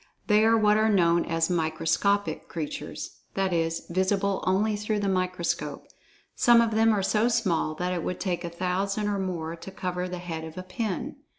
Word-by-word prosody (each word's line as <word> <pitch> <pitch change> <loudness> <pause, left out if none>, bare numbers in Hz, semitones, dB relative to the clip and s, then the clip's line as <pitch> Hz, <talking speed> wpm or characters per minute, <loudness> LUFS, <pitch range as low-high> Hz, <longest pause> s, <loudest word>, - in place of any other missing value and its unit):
They 210 0 +4
are 225 0 +5
what 210 -1 +4
are 220 0 +3
known 170 -4 +3
as 165 0 +1
"microscopic" 165 +2 0
creatures—that 180 +3 -4
is, 165 -1 0
visible 190 +2 0
only 210 +3 +2
through 210 +1 -1
the 205 - -1
microscope. 185 -2 -1 0.5
Some 240 -1 +6
of 230 -1 +3
them 225 +1 +4
are 205 -3 +1
so 215 +4 +2
small 190 -10 +1
that 180 +2 -2
it 175 -2 -2
would 180 - -3
take 180 -2 -2
a 170 - -3
thousand 190 +4 -1
or 205 -1 -1
more 170 -4 -3
to 165 - -9
cover 180 -1 -3
the 180 - -4
head 170 -2 -5
of 160 +1 -9
a 185 - -4
pin. 185 +2 -4
185 Hz, 185 wpm, -27 LUFS, 170-210 Hz, 0.5 s, Some